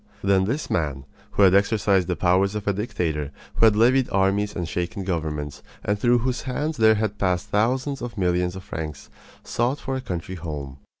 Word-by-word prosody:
Then 95 Hz, -1 st, +3 dB
this 140 Hz, +9 st, -2 dB
man, 70 Hz, -5 st, -1 dB, 0.3 s
who 100 Hz, -, +4 dB
had 95 Hz, -1 st, +6 dB
exercised 100 Hz, -2 st, +3 dB
the 90 Hz, -, 0 dB
powers 95 Hz, +3 st, +2 dB
of 105 Hz, -1 st, -4 dB
a 100 Hz, -, +3 dB
dictator, 85 Hz, -, -2 dB, 0.3 s
who -, -, +5 dB
had 110 Hz, -2 st, +5 dB
levied 125 Hz, +4 st, +4 dB
armies 100 Hz, +2 st, +1 dB
and 85 Hz, -2 st, -3 dB
shaken 90 Hz, +5 st, -3 dB
governments, 75 Hz, -5 st, -3 dB, 0.2 s
and 105 Hz, 0 st, 0 dB
through 120 Hz, +2 st, +4 dB
whose 125 Hz, +1 st, -1 dB
hands 145 Hz, +4 st, -2 dB
there 110 Hz, -1 st, +5 dB
had 105 Hz, -1 st, -2 dB
passed 90 Hz, -2 st, 0 dB
thousands 130 Hz, +6 st, 0 dB
of 120 Hz, -2 st, -6 dB
millions 90 Hz, -1 st, +1 dB
of 95 Hz, -, -8 dB
francs, 80 Hz, -7 st, -6 dB, 0.3 s
sought 125 Hz, +4 st, -1 dB
for 135 Hz, -, -3 dB
a 130 Hz, -, -3 dB
country 90 Hz, -5 st, -5 dB
home. 75 Hz, -6 st, -6 dB
100 Hz, 190 wpm, -24 LUFS, 90-115 Hz, 0.3 s, had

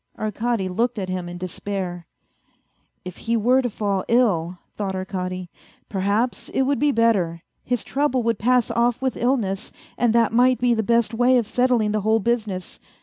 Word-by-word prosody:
Arkady 215 Hz, -1 st, -1 dB
looked 235 Hz, +6 st, -1 dB
at 190 Hz, -2 st, -3 dB
him 180 Hz, -1 st, -3 dB
in 175 Hz, -, -7 dB
despair. 180 Hz, -1 st, -5 dB, 0.5 s
" -, -, -46 dB
If 180 Hz, -1 st, -7 dB
he 230 Hz, 0 st, -1 dB
were 250 Hz, +4 st, +3 dB
to 245 Hz, -, -1 dB
fall 200 Hz, -3 st, -1 dB
ill," 185 Hz, -8 st, +2 dB, 0.2 s
thought 195 Hz, -2 st, -3 dB
Arkady, 185 Hz, -1 st, -4 dB, 0.2 s
" -, -, -32 dB
perhaps 205 Hz, +5 st, -1 dB
it 265 Hz, -, +1 dB
would 280 Hz, +1 st, 0 dB
be 295 Hz, 0 st, +3 dB
better. 200 Hz, -9 st, +1 dB, 0.2 s
His 245 Hz, -2 st, -1 dB
trouble 270 Hz, -3 st, 0 dB
would 230 Hz, -2 st, 0 dB
pass 245 Hz, +1 st, +2 dB
off 235 Hz, 0 st, +1 dB
with 260 Hz, -1 st, -1 dB
illness, 220 Hz, -6 st, -1 dB, 0.3 s
and 240 Hz, -2 st, +3 dB
that 230 Hz, -1 st, +3 dB
might 250 Hz, +2 st, +4 dB
be 245 Hz, -1 st, +2 dB
the 220 Hz, -, +1 dB
best 235 Hz, +1 st, +1 dB
way 245 Hz, +2 st, +4 dB
of 235 Hz, -, +1 dB
settling 245 Hz, -2 st, +1 dB
the 215 Hz, 0 st, 0 dB
whole 220 Hz, +2 st, +2 dB
business. 215 Hz, -5 st, -2 dB
225 Hz, 185 wpm, -23 LUFS, 190-245 Hz, 0.5 s, might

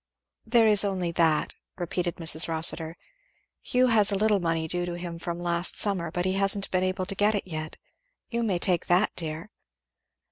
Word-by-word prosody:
"There 230 Hz, 0 st, +4 dB
is 210 Hz, -2 st, +4 dB
only 185 Hz, -4 st, -2 dB
that," 165 Hz, -2 st, +1 dB, 0.2 s
repeated 175 Hz, -1 st, -3 dB
Mrs. 160 Hz, -1 st, +2 dB
Rossitur. 160 Hz, 0 st, 0 dB, 0.6 s
"Hugh 250 Hz, +1 st, +1 dB
has 215 Hz, -3 st, +5 dB
a -, -, 0 dB
little 210 Hz, 0 st, +2 dB
money 165 Hz, -2 st, -1 dB
due 175 Hz, +2 st, -2 dB
to 175 Hz, 0 st, -4 dB
him 170 Hz, -1 st, -7 dB
from 170 Hz, 0 st, -5 dB
last 175 Hz, 0 st, -1 dB
summer, 185 Hz, -5 st, 0 dB
but 175 Hz, +2 st, -3 dB
he 185 Hz, -, 0 dB
hasn't 195 Hz, +1 st, +2 dB
been 185 Hz, -, +1 dB
able 185 Hz, 0 st, -2 dB
to 195 Hz, -, -4 dB
get 205 Hz, +2 st, +2 dB
it 205 Hz, -, -3 dB
yet. 155 Hz, -3 st, -6 dB, 0.5 s
You 235 Hz, -1 st, -3 dB
may 205 Hz, -6 st, 0 dB
take 175 Hz, -1 st, 0 dB
that, 180 Hz, +4 st, +2 dB
dear." 165 Hz, +5 st, -5 dB
180 Hz, 185 wpm, -26 LUFS, 170-200 Hz, 0.6 s, has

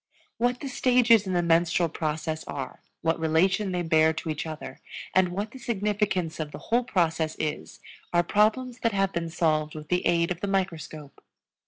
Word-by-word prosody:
What 245 Hz, +1 st, +1 dB
the 280 Hz, -, -4 dB
stages 245 Hz, -5 st, +4 dB
in 185 Hz, -, -1 dB
the 175 Hz, -1 st, +2 dB
menstrual 170 Hz, +1 st, +3 dB
process 155 Hz, 0 st, -3 dB
are, 135 Hz, -2 st, -6 dB, 0.2 s
what 165 Hz, 0 st, +1 dB
relation 185 Hz, +5 st, +2 dB
they 180 Hz, -1 st, -1 dB
bear 160 Hz, -1 st, +4 dB
to 160 Hz, +1 st, -5 dB
each 155 Hz, +1 st, -4 dB
other, 155 Hz, -1 st, -7 dB, 0.3 s
and 185 Hz, -1 st, +4 dB
what 200 Hz, +5 st, -4 dB
the 265 Hz, -, -11 dB
significance 205 Hz, -7 st, -1 dB
of 155 Hz, -2 st, -4 dB
the -, -, -7 dB, 0.2 s
whole 245 Hz, +1 st, +4 dB
process 165 Hz, -8 st, 0 dB
is, 155 Hz, -1 st, -4 dB, 0.3 s
are 175 Hz, 0 st, +3 dB
problems 225 Hz, +6 st, +1 dB
that 230 Hz, -2 st, 0 dB
have 195 Hz, -1 st, +1 dB
been 170 Hz, -1 st, -2 dB
solved 155 Hz, -2 st, 0 dB
with 155 Hz, -1 st, -9 dB
the 180 Hz, 0 st, +1 dB
aid 170 Hz, 0 st, +2 dB
of 175 Hz, 0 st, -3 dB
the 200 Hz, -, -1 dB
microscope. 165 Hz, -6 st, -3 dB
175 Hz, 185 wpm, -27 LUFS, 160-205 Hz, 0.3 s, stages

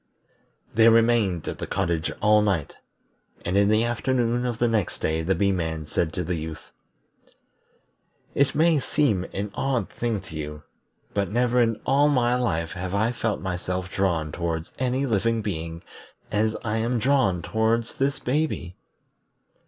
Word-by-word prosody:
They 115 Hz, +1 st, +6 dB
remained 115 Hz, -7 st, +3 dB
at -, -, -4 dB
the -, -, -4 dB
cottage 85 Hz, -2 st, -1 dB
all 105 Hz, 0 st, +6 dB
night, 95 Hz, -8 st, 0 dB, 0.7 s
and 90 Hz, +2 st, -1 dB
in 100 Hz, 0 st, +4 dB
the 110 Hz, +1 st, +3 dB
afternoon 120 Hz, 0 st, 0 dB
of 120 Hz, -2 st, -2 dB
the 120 Hz, -, +2 dB
next 110 Hz, -6 st, 0 dB
day 80 Hz, +1 st, -1 dB
the 95 Hz, +4 st, +1 dB
Bee 100 Hz, -1 st, +2 dB
man 80 Hz, -4 st, -2 dB
said 80 Hz, +2 st, -1 dB
to 90 Hz, -, -2 dB
the 90 Hz, +2 st, -2 dB
Youth: 80 Hz, -1 st, -6 dB, 1.6 s
"It 140 Hz, 0 st, +2 dB
may 160 Hz, 0 st, +4 dB
seem 125 Hz, -9 st, +1 dB
an 100 Hz, +1 st, -4 dB
odd 125 Hz, -6 st, -1 dB
thing 115 Hz, -3 st, -2 dB
to 85 Hz, -, -11 dB
you, 75 Hz, 0 st, -6 dB, 0.5 s
but 100 Hz, -3 st, 0 dB
never 125 Hz, +3 st, +2 dB
in 115 Hz, -2 st, +1 dB
all 145 Hz, +2 st, +4 dB
my 125 Hz, -4 st, +2 dB
life 85 Hz, -10 st, -1 dB
have 90 Hz, +1 st, -4 dB
I 110 Hz, +4 st, +2 dB
felt 115 Hz, -3 st, -2 dB
myself 90 Hz, 0 st, -3 dB
drawn 85 Hz, -6 st, 0 dB
towards 80 Hz, 0 st, -3 dB
any 130 Hz, +2 st, 0 dB
living 115 Hz, -1 st, +1 dB
being 85 Hz, -4 st, -4 dB, 0.5 s
as 110 Hz, +1 st, +1 dB
I 110 Hz, 0 st, -1 dB
am 115 Hz, +2 st, 0 dB
drawn 115 Hz, -, +2 dB
towards 110 Hz, +3 st, 0 dB
this 135 Hz, 0 st, 0 dB
baby. 125 Hz, -, -2 dB
105 Hz, 160 wpm, -25 LUFS, 90-120 Hz, 1.6 s, They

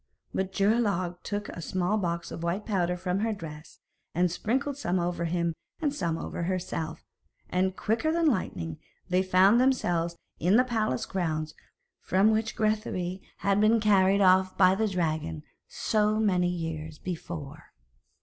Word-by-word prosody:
But 190 Hz, 0 st, -1 dB
Geirlaug 195 Hz, -4 st, +1 dB
took 205 Hz, 0 st, -4 dB
a 170 Hz, -, -7 dB
small 185 Hz, +4 st, 0 dB
box 170 Hz, -2 st, -2 dB
of -, -, -6 dB
white 170 Hz, +5 st, -2 dB
powder 180 Hz, -4 st, 0 dB
from 180 Hz, +1 st, -1 dB
her 225 Hz, +2 st, 0 dB
dress, 155 Hz, -5 st, -9 dB, 0.4 s
and 175 Hz, 0 st, +2 dB
sprinkled 265 Hz, +10 st, -1 dB
some 185 Hz, -10 st, -1 dB
over 175 Hz, 0 st, -1 dB
him 170 Hz, 0 st, 0 dB, 0.3 s
and 295 Hz, -3 st, 0 dB
some 170 Hz, -, -1 dB
over -, -, -5 dB
herself, 170 Hz, -3 st, -3 dB, 0.5 s
and, 185 Hz, +1 st, +1 dB
quicker 225 Hz, +12 st, 0 dB
than 335 Hz, 0 st, +1 dB
lightning, 85 Hz, -, -1 dB, 0.3 s
they 180 Hz, +1 st, +3 dB
found 190 Hz, +5 st, +5 dB
themselves 175 Hz, -10 st, +1 dB, 0.2 s
in 180 Hz, +5 st, +3 dB
the 250 Hz, -, +6 dB
palace 220 Hz, -, -1 dB
grounds 155 Hz, -4 st, -2 dB, 0.5 s
from 195 Hz, +4 st, +3 dB
which 220 Hz, +1 st, 0 dB
Grethari 195 Hz, -4 st, -1 dB, 0.2 s
had 200 Hz, +1 st, +3 dB
been 220 Hz, +2 st, +5 dB
carried 200 Hz, -2 st, +4 dB
off 185 Hz, 0 st, +4 dB
by 185 Hz, -1 st, +6 dB
the 220 Hz, +3 st, +1 dB
dragon 155 Hz, -, -2 dB, 0.2 s
so 215 Hz, 0 st, +1 dB
many 180 Hz, -5 st, +2 dB
years 160 Hz, -3 st, -4 dB
before. 160 Hz, -4 st, -6 dB
185 Hz, 150 wpm, -28 LUFS, 170-215 Hz, 0.5 s, the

